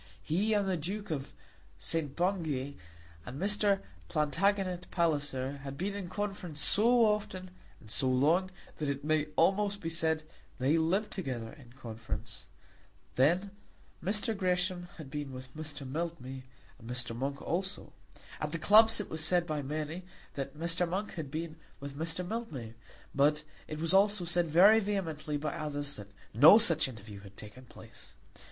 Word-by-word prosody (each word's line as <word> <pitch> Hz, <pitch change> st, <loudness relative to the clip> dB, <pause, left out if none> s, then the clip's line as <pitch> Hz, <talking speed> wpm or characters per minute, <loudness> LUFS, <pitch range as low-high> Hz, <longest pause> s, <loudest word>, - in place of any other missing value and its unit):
He 195 Hz, -, +1 dB
and 200 Hz, -1 st, +2 dB
the 185 Hz, -2 st, +1 dB
Duke 195 Hz, +5 st, -4 dB
of 140 Hz, -3 st, -4 dB, 0.4 s
St. 155 Hz, -4 st, -2 dB
Bungay, 160 Hz, -7 st, 0 dB, 0.5 s
and 130 Hz, -, -7 dB
Mr. 200 Hz, 0 st, +2 dB, 0.3 s
Plantagenet 180 Hz, +4 st, +1 dB
Palliser, 145 Hz, -5 st, 0 dB
had 140 Hz, 0 st, -7 dB
been 195 Hz, +6 st, -2 dB
in 200 Hz, -3 st, -5 dB
conference 195 Hz, -5 st, -4 dB
so 230 Hz, -, +5 dB
often, 195 Hz, -3 st, -1 dB, 0.3 s
and -, -, -16 dB
so 130 Hz, +2 st, +1 dB
long, 155 Hz, +9 st, +3 dB, 0.3 s
that 150 Hz, -2 st, -1 dB
it 140 Hz, 0 st, -3 dB
may 155 Hz, 0 st, +2 dB
almost 200 Hz, +3 st, +3 dB
be 165 Hz, -4 st, -4 dB
said 160 Hz, -1 st, 0 dB, 0.3 s
they 135 Hz, +5 st, +3 dB
lived 175 Hz, +6 st, +1 dB
together 125 Hz, -, -4 dB
in 125 Hz, -5 st, -15 dB
conference. 115 Hz, -4 st, -7 dB, 0.7 s
Then 175 Hz, +9 st, +3 dB, 0.5 s
Mr. 210 Hz, +4 st, 0 dB
Gresham 180 Hz, -1 st, 0 dB
had 150 Hz, -5 st, -9 dB
been 145 Hz, -3 st, -4 dB
with 130 Hz, +1 st, -9 dB
Mr. 150 Hz, -3 st, -6 dB
Mildmay, 135 Hz, -4 st, -4 dB, 0.3 s
and 115 Hz, -, -11 dB
Mr. 125 Hz, -2 st, -2 dB
Monk 140 Hz, +3 st, -2 dB
also. 190 Hz, +4 st, -3 dB, 0.5 s
At -, -, -3 dB
the -, -, 0 dB
clubs 220 Hz, +7 st, +6 dB
it 210 Hz, -, -3 dB
was 160 Hz, 0 st, -3 dB
said 175 Hz, +2 st, +2 dB
by 155 Hz, -3 st, -2 dB
many 155 Hz, +4 st, -3 dB, 0.3 s
that 140 Hz, +2 st, -5 dB
Mr. 170 Hz, +2 st, 0 dB
Monk 195 Hz, +4 st, -2 dB
had 160 Hz, -5 st, -5 dB
been 160 Hz, +2 st, -4 dB, 0.2 s
with 140 Hz, 0 st, -6 dB
Mr. 165 Hz, +3 st, -2 dB
Mildmay; 155 Hz, -, -5 dB, 0.4 s
but 150 Hz, +2 st, +3 dB, 0.2 s
it 155 Hz, -, -5 dB
was 165 Hz, +3 st, -1 dB
also 200 Hz, -1 st, +4 dB
said 175 Hz, 0 st, +1 dB
very 190 Hz, +8 st, +7 dB
vehemently 165 Hz, -8 st, -2 dB
by 150 Hz, +1 st, -2 dB
others 145 Hz, -1 st, -3 dB
that 105 Hz, -2 st, -8 dB, 0.3 s
no 145 Hz, -, +10 dB
such 165 Hz, -10 st, +4 dB
interview 105 Hz, -4 st, -9 dB
had 100 Hz, -1 st, -14 dB
taken 115 Hz, +5 st, -11 dB
place. -, -, -14 dB
160 Hz, 160 wpm, -32 LUFS, 140-190 Hz, 0.7 s, no